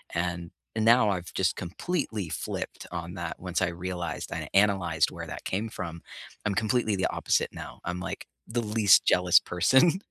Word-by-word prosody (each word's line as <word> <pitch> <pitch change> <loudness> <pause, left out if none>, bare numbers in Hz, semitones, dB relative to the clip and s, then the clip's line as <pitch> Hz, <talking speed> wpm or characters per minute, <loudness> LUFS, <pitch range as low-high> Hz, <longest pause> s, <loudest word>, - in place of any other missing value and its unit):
and 85 0 -2 0.3
n 110 - 0
now, 115 -2 +6
I've 90 -2 -4
just 95 -3 +1
completely 105 - -3
flipped - - -5
on 85 0 -5
that, 85 -2 -5
once 90 0 -2
I 95 - +3
realized, 85 -1 -4
and - - -3
I - - -11
analyzed 95 -6 +3
where - - -7
that - - -8
came 105 +4 -2
from. 85 -4 -6 0.4
I'm 100 -2 0
completely 110 0 +1
the 95 - +1
opposite - - +1
now, - - -9
I'm, 90 +1 -3
like, 95 - -5 0.2
the 120 +1 -1
least 105 -2 +5
jealous 90 -1 +5
person, 130 - +3
95 Hz, 180 wpm, -28 LUFS, 85-110 Hz, 0.4 s, now